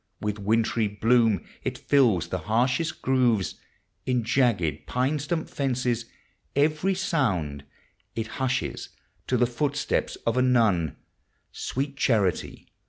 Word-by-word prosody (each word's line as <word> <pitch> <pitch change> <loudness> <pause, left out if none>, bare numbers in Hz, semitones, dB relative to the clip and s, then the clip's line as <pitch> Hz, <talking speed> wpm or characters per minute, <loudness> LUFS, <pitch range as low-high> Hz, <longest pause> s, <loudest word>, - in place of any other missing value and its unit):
With 105 0 -3
wintry 110 +2 +1
bloom 110 -2 +2 0.2
it - - -2
fills 110 - +3
the 95 - -2
liarshost 125 - 0
gTOOVefl 125 -7 +2 0.5
In 125 -2 +1
jagged 110 - +1
pine 130 +4 0
stump 160 +3 -2
fences. 125 -4 -1 0.5
K\< 140 +1 +5
r\ 155 +5 0 0.2
Bound 85 - 0 0.5
It 115 -1 -2
hushes 130 0 -1 0.4
to 125 - +2
the 120 - +4
footstep 140 +4 -1 0.2
of 115 +1 +1
a - - +4
nun. 110 - +2 0.6
Sweet 140 +1 -3
Charity! 105 - 0
120 Hz, 120 wpm, -26 LUFS, 105-130 Hz, 0.6 s, K\<